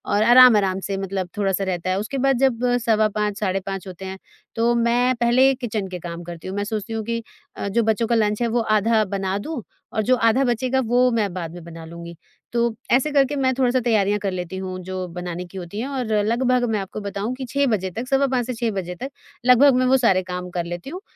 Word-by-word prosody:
और 210 - +3
आराम-आराम 220 -6 +6
से 195 - -2
मतलब 195 -1 -3
थोड़ा-सा 195 -1 0
रहता 185 -1 -2
है। 185 +1 +1
उसके 250 +6 -4
बाद 270 -1 +2
जब 255 -3 +2 0.2
सवा 215 -1 +3
5, 210 0 -2
साढ़े 195 -2 0
5 195 0 -6
होते 185 +1 -8
हैं, 190 0 -6 0.4
तो 230 +1 +2
मैं 240 +2 +2
पहले 250 +3 +4
किचन 220 -6 -3
के 180 -1 -6
काम 170 0 -7
करती 170 0 -8
हूँ। 190 - -5
मैं 205 - 0
सोचती 215 +1 -4
हूँ 220 -1 -2
कि 230 +1 -2 0.4
अ, - - -3
जो 235 - +3
बच्चों 220 +1 +1
का 235 - +2
लंच 210 0 +1
है, 235 - +2
वो 235 +1 0
आधा 220 0 +2
बना 195 0 -1
दूँ 295 +6 -5 0.3
और 220 - +1
जो 255 +4 +3
आधा 230 +3 +3
बचेगा 255 +2 0
वो 245 +2 +3
मैं 210 -6 0
बाद 170 -3 -5
में 175 - -9
बना 165 -1 -10
लूँगी। 170 +1 -9 0.4
तो 235 - +1 0.3
ऐसे 265 +5 +3
करके 280 0 +2
मैं 260 -2 +1
थोड़ा-सा 255 -1 +2
तैयारियाँ 210 -4 +2
कर 195 -1 -2
लेती 180 0 -5
हूँ 185 -1 -5
जो 185 0 -4
बनाने 180 0 -5
की 180 +2 -11
होती 180 +3 -6
हैं 250 - -2
और 265 -3 -3 0.2
लगभग 250 +2 +2
मैं 215 - 0
आपको 195 +2 -6
बताऊँ 200 +4 -3
कि 260 0 -6
6 280 +2 +1
बजे 195 -6 0
तक 230 +7 -5
सवा 270 +1 +2
5 250 -2 0
से 255 - -2
6 230 -1 -1
बजे 180 -3 -4
तक, 265 +10 -6 0.4
लगभग 255 +2 +6
मैं 255 - +2
वो 260 +1 +4
सारे 195 -7 +3
काम 180 0 -5
कर 175 -1 -3
लेती 175 +7 -6
हूँ 360 +5 -7
215 Hz, 240 wpm, -22 LUFS, 190-245 Hz, 0.4 s, आराम-आराम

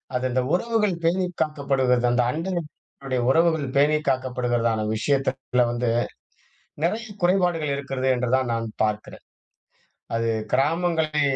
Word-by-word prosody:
அது 125 +1 0
இந்த 130 +1 +1
உறவுகள் 210 0 +1
பேணி 180 +3 +2 0.2
காக்கப்படுகிறது. 135 -5 +1
அந்த 125 0 +3
அண்டைய 155 -5 -4
உறவுகள் 160 0 +3
பேணி 150 +2 +4
காக்கப்படுகிறதான 120 -4 0
விஷயத்தில 130 0 0
வந்து 120 0 -1 1.0
நெறைய 220 +6 0 0.2
குறைபாடுகள் 175 -5 +2
இருக்கிறது 135 -1 -2
என்றுதான் 125 +1 +1
நான் 115 0 -1 0.2
பார்க்கிறேன். 105 0 -4 0.9
அது 115 0 0 0.2
கிராமங்களை 155 +2 +1
135 Hz, 105 wpm, -24 LUFS, 125-165 Hz, 1.0 s, பேணி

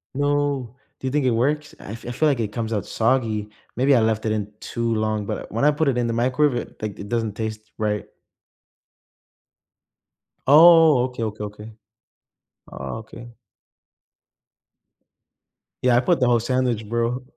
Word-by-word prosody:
No, 145 -4 0 0.2
do 130 - -4
you - - -1
think 145 -1 +1
it 125 - +3
works, 145 +6 -1
I - - -9
f 115 - -9
I - - -3
feel 155 +6 +1
like 135 -4 0
it 105 -2 -2
comes 115 -1 -3
out 105 - -2
soggy, 110 -3 0 0.3
maybe 135 +3 +3
I - - +5
left 110 0 0
it 110 - +1
in 105 -1 -2
too 115 -1 -2
long, 110 -1 -1
but - - -5
when 115 +4 -2
I 150 - +6
put 150 0 0
it 130 - +1
in 120 -1 0
the 115 - -1
microwave, 125 +2 0
like, 105 -2 -4
it 100 - -8
doesn't 115 -3 -1
taste 110 0 -5
right. 105 -1 -1 2.4
Oh, 160 -3 +7
okay, 125 -3 -5
okay, 105 -1 -4
okay. 105 +1 -9 1.0
Oh, - - -6
okay. 120 +2 -12 2.5
Yeah, 125 -1 +4
I - - +5
put 175 +6 +1
the 125 - +3
whole 120 -1 +4
sandwich, 120 -3 -1
bro. 120 +2 -1
120 Hz, 165 wpm, -22 LUFS, 110-130 Hz, 2.5 s, Oh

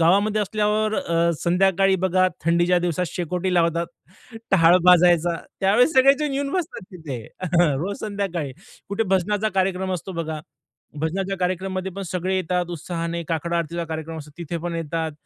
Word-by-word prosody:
गावामध्ये 200 +6 +3
असल्यावर 215 +1 0
अ, 170 -3 +1
संध्याकाळी 190 +2 +3
बघा 185 0 +3 0.2
थंडीच्या 175 +2 +3
दिवसात 175 +1 -1
शेकोटी 180 +2 -2
लावतात, 170 0 +2 0.6
टहाळ 175 -2 +6
भाजायचा. 175 -1 +5 0.2
त्यावेळेस 225 +10 +4
सगळेजण 275 +2 +4
येऊन 280 0 -1
बसतात 350 - -3
तिथे, 150 -9 -6 0.5
रोज 195 +7 -3
संध्याकाळी. 195 -9 -3 0.4
कुठे 200 +3 0
भजनाचा 205 +3 +1
कार्यक्रम 190 0 0
असतो, 185 +2 -5
बघा. 160 -2 -4 0.6
भजनाच्या 190 +5 -2
कार्यक्रममध्ये 185 +1 -2
पण 195 - -6
सगळे 185 +2 -2
येतात 180 0 0
उत्साहाने, 170 0 -4
काकड 170 +1 -2
आरतीचा 170 0 -2
कार्यक्रम 160 0 -5
असतो 150 0 -10
तिथे 170 0 -4
पण 175 -1 -3
येतात. 165 -1 -3
180 Hz, 140 wpm, -23 LUFS, 170-195 Hz, 0.6 s, टहाळ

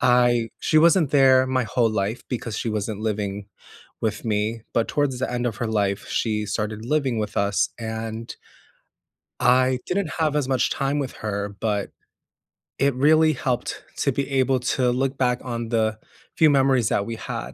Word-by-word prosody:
I 120 -2 +3
she 155 - +3
wasn't 165 -2 +4
there 130 -2 +5
my 130 -1 +1
whole 115 0 +1
life 105 +2 -2
because 115 -4 -4
she 115 - -2
wasn't 105 0 -3
living 105 -2 -3 0.6
with 110 -1 -2
me, 110 +1 -1
but 115 - +1
towards 140 -4 0
the 130 - -2
end 120 0 -2
of 115 - -3
her 115 - -2
life, 100 -2 -1
she 105 -2 -1
started 105 +1 -3
living 135 -3 0
with 105 -1 -4
us 100 0 +1
and 110 0 -5 1.1
I 130 +1 +4
didn't 180 -3 -1
have 155 -2 +1
as 145 -3 0
much 130 -2 +1
time 140 +1 -1
with 135 -2 -3
her, 100 -2 -4
but 105 -3 -1 0.9
it 140 -1 +2
really 155 +3 +4
helped 125 -2 -3 0.2
to - - +2
be 140 - -2
able 130 -1 +2
to 125 0 +1
look 135 +2 -1
back 125 -1 +1
on 120 -2 -4
the 110 -2 +1 0.4
few 155 -1 +5
memories 135 -5 +3
that 100 - 0
we 115 - -4
had, 65 - -6
120 Hz, 175 wpm, -23 LUFS, 110-135 Hz, 1.1 s, there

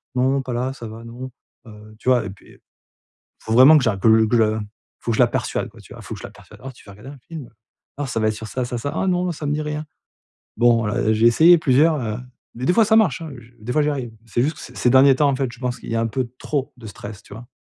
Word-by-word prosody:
«Non 130 +2 +1
pas 125 -1 -5
là, 125 +2 -2
ça 120 -4 -9
va 110 +1 -10
non», 120 +3 -9 0.4
heu, 105 0 -14
tu 130 - -2
vois? 125 -3 +3
Et - - -5
puis, 100 - -17 0.8
faut 110 - -3
vraiment 130 +6 +8
que 145 - +1
je 115 - +2
la 100 - -2
que 110 +2 +4
que 120 - +1
je 115 - +5
la 110 0 -1 0.4
faut 115 - -2
je - - -2
la 125 - +6
persuade - - -3
quoi, - - -18
tu - - -14
vois? - - -11
Faut - - -7
que - - -11
je - - -7
la - - -10
persuade: - - -17
«Alors 135 +1 -8
tu - - -19
veux 100 - -12
regarder 105 +7 -12
un 145 - -12
film? 155 -7 -8 0.5
Alors 145 -2 -4
ça 115 - -2
va 110 - +1
être - - -2
sur 110 +1 -8
ça, 125 +3 -3
ça, 120 0 -4
ça, 140 +5 -4
"ah 190 - -1
non 180 -1 0
ça 155 -2 -7
me 145 - 0
dit 150 - -2
rien"». 150 0 -4 0.7
Bon, 120 -2 +3
heu, 105 +1 0
j'ai 110 +2 +3
essayé 165 +9 +6
plusieurs, 155 +2 +3
heu, 110 -3 -3 0.4
mais 125 - -6
des - - +4
fois 225 +4 +4
ça 220 +1 +4
marche 185 - +2
hein, 160 - -7
je 120 +1 -16
des 115 +3 -5
fois 150 - +2
j'y 150 - +1
arrive. 130 -5 -4
C'est 120 +1 0
juste 150 +3 -1
que - - -12
ces - - -11
ces 125 - +2
derniers 135 +2 +6
temps 145 +1 +3
en 135 - -1
fait, 130 -2 -2
je 125 - -14
pense 125 -1 -3
qu'il - - -9
y - - -2
a - - +1
un 115 - 0
peu 125 +1 -3
trop 140 -3 -3
de 115 - -11
stress 105 0 -9
tu 100 - -13
vois? 115 +3 -11
125 Hz, 305 wpm, -21 LUFS, 115-145 Hz, 0.8 s, vraiment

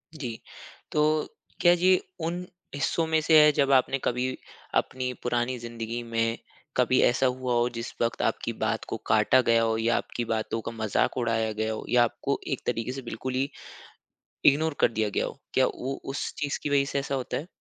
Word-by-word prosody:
जी। 125 -7 -5 0.5
तो 150 - +2 0.6
क्या 175 0 +7
जी 185 +1 +4 0.3
उन 175 +2 -3 0.3
हिस्सों 160 +3 0
में 160 0 +3
से 155 0 +6
है 150 - +7
जब 140 -1 +2
आपने 135 0 +4
कभी 125 +1 -1 0.4
अपनी 130 -1 0
पुरानी 120 +1 0
ज़िंदगी 115 0 -5
में 115 0 -1 0.4
कभी - - +4
ऐसा 120 +2 +3
हुआ 125 -1 0
हो, 120 0 +2
जिस 115 0 -6
वक़्त 115 0 0
आपकी - - -1
बात - - -1
को - - -2
काटा 110 +4 +4
गया 115 -1 +3
हो, 115 -1 +1
या 115 +1 +2
आपकी 120 - -3
बातों 115 0 -2
का 115 - -5
मज़ाक 110 +2 0
उड़ाया 115 -2 0
गया 110 +1 -1
हो - - -6
या 125 -1 +5
आपको 120 - -1
एक - - -2
तरीके 115 +2 -1
से 135 +1 -5
बिल्कुल 130 +1 -5
ही 135 +2 0 1.0
इग्नोर 155 +2 +4
कर - - +4
दिया 110 -1 0
गया - - 0
हो। - - -7
क्या - - +4
वो 135 +2 -4
उस - - -3
चीज़ 145 -1 -2
की - - -1
वज़ह 140 -1 +3
से 140 - 0
ऐसा 140 0 -2
होता 130 -2 -3
है? 155 - -6
125 Hz, 200 wpm, -27 LUFS, 115-140 Hz, 1.0 s, क्या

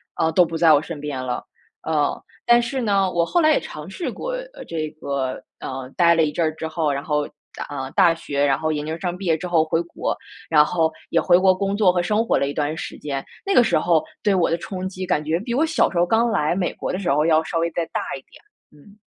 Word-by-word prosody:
啊， 160 0 +1
都 180 +2 +5
不 165 0 -4
在 160 -1 +6
我 145 - +4
身 160 -2 -7
边 145 -3 -4
了。 125 -1 -3 0.4
呃， 150 -3 0 0.3
但 240 0 +6
是 250 +2 -3
呢， 200 -4 +2
我 170 -1 +2
后 345 - +1
来 310 -2 +5
也 - - +3
尝 150 +2 -8
试 330 - -4
过 - - -5 0.3
这 155 -2 -3
个， 135 -2 -2 0.2
呃， 130 -1 -6
待 170 -1 +5
了 165 - +3
一 150 - 0
阵 170 - -1
儿 155 - -1
之 160 - -4
后， 160 -2 -1
然 140 0 -3
后 150 -1 0 0.3
大 - - -5
呃， 135 -2 -5
大 180 -4 +5
学， 145 -3 -2
然 135 -1 +2
后 155 0 0
研 150 -1 -2
究 160 +1 -3
生 180 -2 -2
毕 195 - -7
业 160 -1 +3
之 180 - -5
后 165 -3 +3
回 160 +1 0
国， 170 - -3 0.3
然 150 -2 +6
后 160 -1 +1 0.2
也 165 - +3
回 175 -1 +5
国 185 0 +5
工 195 +1 -1
作 190 -4 +4
和 175 - +1
生 210 +6 +1
活 - - +2
了 140 - 0
一 140 - -3
段 150 +1 -1
时 - - -6
间， 140 -2 -4 0.2
那 395 - +1
个 245 - +7
时 - - +2
候 165 -3 +2 0.2
对 205 -2 +3
我 180 -3 +2
的 165 - +1
冲 185 +1 -5
击 185 0 -6
感 150 -4 0
觉 160 +2 0
比 235 +5 -4
我 275 +6 +2
小 320 - +2
时 180 - -5
候 175 - +4
刚 225 +5 +2
来 155 -3 +1
美 180 -2 -1
国 - - -4
的 - - -2
时 190 - -2
候 150 +2 +3
要 160 -1 +4
稍 165 +1 -2
微 170 - +1
再 170 - -2
大 - - -3 0.2
一 - - -12
点。 - - -17 0.3
嗯。 175 +8 -19
165 Hz, 290 characters per minute, -22 LUFS, 150-190 Hz, 0.4 s, 个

